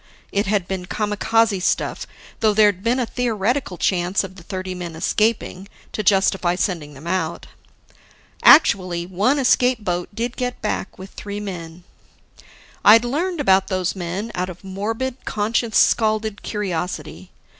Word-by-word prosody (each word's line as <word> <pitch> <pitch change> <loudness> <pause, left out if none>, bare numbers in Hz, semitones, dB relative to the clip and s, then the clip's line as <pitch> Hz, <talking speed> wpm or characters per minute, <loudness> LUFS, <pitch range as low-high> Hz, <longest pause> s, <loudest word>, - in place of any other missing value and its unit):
It 200 0 0
had 200 -3 0
been 185 -2 -4
kamikaze 210 0 +1
stuff, - - -1 0.3
though 215 -2 +2
there'd 205 -3 +4
been 235 +2 +2
a 250 - +1
theoretical 235 -2 -1
chance 180 +2 +1
of 190 -1 -8
the 185 - -12
thirty 185 +1 -5
men 175 -2 -6
escaping, 200 +2 0 0.2
to - - -3
justify 190 -2 +2
sending 165 -6 -2
them 135 +4 -12
out. 170 -2 -2 1.0
Actually, 185 - +5
one 200 +10 +1
escape 250 -3 +2
boat 175 -1 -2
did 230 +4 -3
get 250 -1 -3
back - - -3
with 190 +1 -10
three 205 0 -6
men. 175 -4 -7 1.0
I'd 225 +3 +7
learned 335 +7 -2
about 190 -8 +3
those 185 -1 -1
men, 190 +5 -4
out 180 +1 -2
of 180 +1 -10
morbid, 225 +7 -4
conscience 220 +2 0
scalded 215 -1 +2
curiosity. 185 -4 -4
200 Hz, 145 wpm, -21 LUFS, 180-225 Hz, 1.0 s, I'd